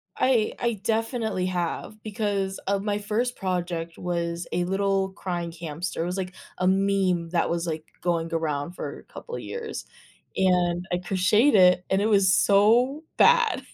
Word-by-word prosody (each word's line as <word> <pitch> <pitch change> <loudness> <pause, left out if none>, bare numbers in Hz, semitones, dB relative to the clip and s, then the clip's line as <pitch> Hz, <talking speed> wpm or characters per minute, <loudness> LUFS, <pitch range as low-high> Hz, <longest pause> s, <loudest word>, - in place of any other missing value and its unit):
I 245 -5 +2
I 235 -1 +1
definitely 225 -3 -1
have 180 +4 -3
because 205 -3 -2
of 200 0 0
my 205 -1 0
first 225 +4 -1
project 175 -3 -3
was 170 -1 -3
a 175 - 0
little 195 +1 0
crying 175 -3 -4
hamster, 165 +1 -4
it - - -2
was 180 +2 -3
like 185 -1 -4 0.3
a 185 - +2
meme 190 -3 +1
that 170 0 +1
was, 170 0 -1
like, 155 -1 -4 0.2
going 170 -1 0
around 155 -1 -1
for - - -6
a - - -16
couple 480 - -7
of - - -5
years 460 -2 -6 0.5
and 180 -1 +2
I 175 - +1
crocheted 195 +8 +3
it 180 -1 +5
and 190 - +2
it 210 - +1
was 200 -3 +4
so 220 +10 +4
bad, 475 -1 +4
190 Hz, 165 wpm, -25 LUFS, 175-210 Hz, 0.5 s, it